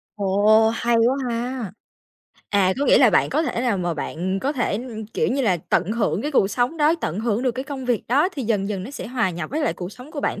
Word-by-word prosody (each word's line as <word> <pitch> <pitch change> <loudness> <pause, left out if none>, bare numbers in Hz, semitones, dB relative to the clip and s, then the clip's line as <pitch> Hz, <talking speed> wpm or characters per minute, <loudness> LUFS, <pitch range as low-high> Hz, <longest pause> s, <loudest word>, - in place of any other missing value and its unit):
Ồ! 210 +2 +4
Hay 235 +1 +1
quá 235 +3 +3
ha. 235 -3 -3 0.8
À, 195 -2 +3
có 285 - +1
nghĩa - - +6
là - - +6
bạn - - +2
có 315 - +1
thể 240 - -2
nào 235 -6 0
mà 175 -2 -1
bạn 180 +5 -3
có 280 +6 -1
thể, 250 -4 -1 0.2
ưm, 220 -2 -7
kiểu - - -1
như 270 +1 0
là, 190 -6 +2
tận 180 +3 -1
hưởng 210 -5 0
cái 295 - -2
cuộc 195 -8 +3
sống 245 +8 -1
đó, 305 +1 +3
tận 170 - -3
hưởng 230 +1 0
được 255 - +2
cái 260 +2 -5
công 270 -2 -6
việc 245 -4 0
đó, 285 +9 +3
thì 280 -7 -4
dần 210 -3 0
dần 200 -3 -3
nó 210 - -7
sẽ 285 - -7
hòa 235 -6 0
nhập 170 -2 -6
với 310 +3 -2
lại 295 - +1
cuộc 180 +2 -7
sống 255 +5 -12
của 290 - -5
bạn - - -2
230 Hz, 265 wpm, -22 LUFS, 195-260 Hz, 0.8 s, nghĩa